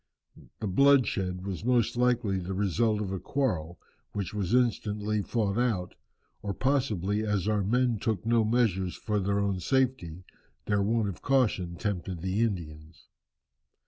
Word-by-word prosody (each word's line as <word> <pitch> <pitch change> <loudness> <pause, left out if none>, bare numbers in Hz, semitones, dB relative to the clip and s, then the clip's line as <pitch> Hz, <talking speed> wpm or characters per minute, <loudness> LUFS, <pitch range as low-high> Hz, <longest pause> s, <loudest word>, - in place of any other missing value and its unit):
The 110 - -2
bloodshed 95 -6 +3
was 95 -2 -4
most 120 -2 +2
likely 120 -5 +1
the 95 +1 -4
result 105 +3 +1
of 100 -3 -3
a 95 - -3
quarrel 90 - -2 0.4
which 100 -2 -3
was 100 -4 -2
instantly 105 -4 +1
fought 105 0 -1
out, 110 -8 0 0.5
or 100 -1 -4
possibly 110 -7 0
as 105 -2 0
our 105 -2 +1
men 120 +2 +1
took 110 -2 -2
no 115 0 +3
measures 105 -6 +1
for 105 -2 -2
their 100 +1 0
own 100 -2 0
safety, 95 -7 0 0.4
their 105 -1 +1
want 110 +1 +1
of 95 -4 -6
caution 105 -10 +1
tempted 90 -3 -3
the 95 +2 -1
Indians." 80 -7 -4
105 Hz, 145 wpm, -28 LUFS, 95-115 Hz, 0.5 s, bloodshed